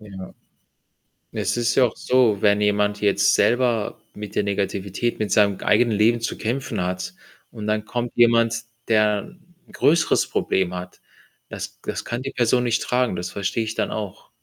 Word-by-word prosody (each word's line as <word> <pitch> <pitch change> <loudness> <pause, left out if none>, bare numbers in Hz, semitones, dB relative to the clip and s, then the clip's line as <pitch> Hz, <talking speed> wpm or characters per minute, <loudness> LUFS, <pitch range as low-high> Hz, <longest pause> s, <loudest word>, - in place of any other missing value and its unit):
Ja. 95 -3 -10 1.0
Es - - -1
ist 120 0 +1
ja 130 - +5
auch 115 - -4
so, 120 -6 +2
wenn 105 0 +3
jemand 105 0 +1
jetzt 100 -1 +3
selber 120 0 +1
mit 105 -1 -8
der 105 - +2
Negativität, 100 +2 -2
mit 110 -1 -2
seinem 100 -2 +3
g - - -9
eigenen 120 -1 +3
Leben 115 +2 +3
zu 115 - -3
kämpfen 120 -1 -3
hat 90 0 -3 0.4
und 105 -2 -7
dann 105 0 0
kommt 120 +1 -3
jemand, 115 -1 +3 0.2
der 105 - +1 0.3
’n - - -19
größeres 160 +2 +2
Problem 90 -1 0
hat, 90 0 -8 0.5
das - - -7
g - - -8
das - - -6
kann 120 +1 -4
die 135 +1 -5
Person 125 0 +2
nicht 120 -1 0
tragen, 125 -5 0
das 90 +1 -4
verstehe 100 +3 -2
ich 110 0 -5
dann - - -1
auch. 105 -3 -6
110 Hz, 180 wpm, -22 LUFS, 100-120 Hz, 1.0 s, ja